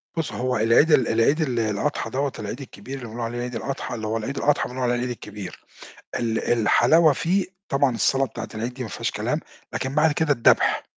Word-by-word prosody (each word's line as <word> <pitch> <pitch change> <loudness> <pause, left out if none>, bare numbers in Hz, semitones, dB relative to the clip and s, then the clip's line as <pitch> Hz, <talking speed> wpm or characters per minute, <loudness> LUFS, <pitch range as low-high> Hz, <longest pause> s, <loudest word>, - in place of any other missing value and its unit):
بُص، 165 -2 -2
هو 125 0 -1
العيد 115 +9 +4
ال 130 - +5
العيد 115 +8 +2
ال 125 -6 0
الأضحى 115 +4 -1
دوّة، 135 +4 -1
العيد 105 +6 -5
الكبير 130 0 -8
اللي 125 - -8
بنقول 115 +2 -7
عليه 120 +1 -3
عيد 125 0 -4
الأضحى، 135 +1 -4
اللي 110 -1 -4
هو 110 +1 -1
العيد 135 +5 -4
الأضحى 145 0 +1
بنقول 130 +1 -4
عليه 120 0 +2
العيد 125 +1 -2
الكبير. 105 -5 -8 0.5
ال 115 -2 0
الحلاوة 155 +8 +5
فيه 180 +7 0 0.2
طبعًا 135 -2 +2
الصلاة 125 +5 +2
بتاعة 115 - -7
العيد 115 +3 -4
دي 130 - -5
ما 115 - -5
فيهاش - - -3
كلام، - - -2 0.3
لكن 130 +1 -3
بعد 150 +1 +4
كده 150 0 +2
الدبح. 120 -5 +3
125 Hz, 210 wpm, -24 LUFS, 115-140 Hz, 0.5 s, ال